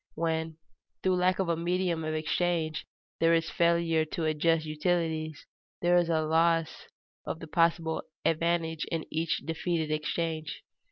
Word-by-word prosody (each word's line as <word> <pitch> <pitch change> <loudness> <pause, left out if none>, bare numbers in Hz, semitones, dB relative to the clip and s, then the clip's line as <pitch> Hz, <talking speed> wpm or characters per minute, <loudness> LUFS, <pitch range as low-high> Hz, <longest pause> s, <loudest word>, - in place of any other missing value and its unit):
When, 160 -1 -1 0.5
through 185 -1 +3
lack 180 +1 +2
of 190 - 0
a 170 - +2
medium 170 0 0
of 155 0 -2
exchange, 160 0 -1 0.3
there 165 0 +5
is 165 0 0
a - - -13
failure 170 -1 +3
to 160 +1 -3
adjust 155 +1 +2
utilities, 155 -1 -1 0.4
there 175 0 +4
is 175 -1 +3
a 160 -1 +2
loss 165 +1 +1 0.4
of - - -4
the 165 - -7
possible 165 0 +1 0.2
advantage 165 -1 +1
in 165 -1 -3
each 160 +1 -1
defeated 165 -1 -1
exchange. 155 0 -2
165 Hz, 150 wpm, -29 LUFS, 155-170 Hz, 0.5 s, there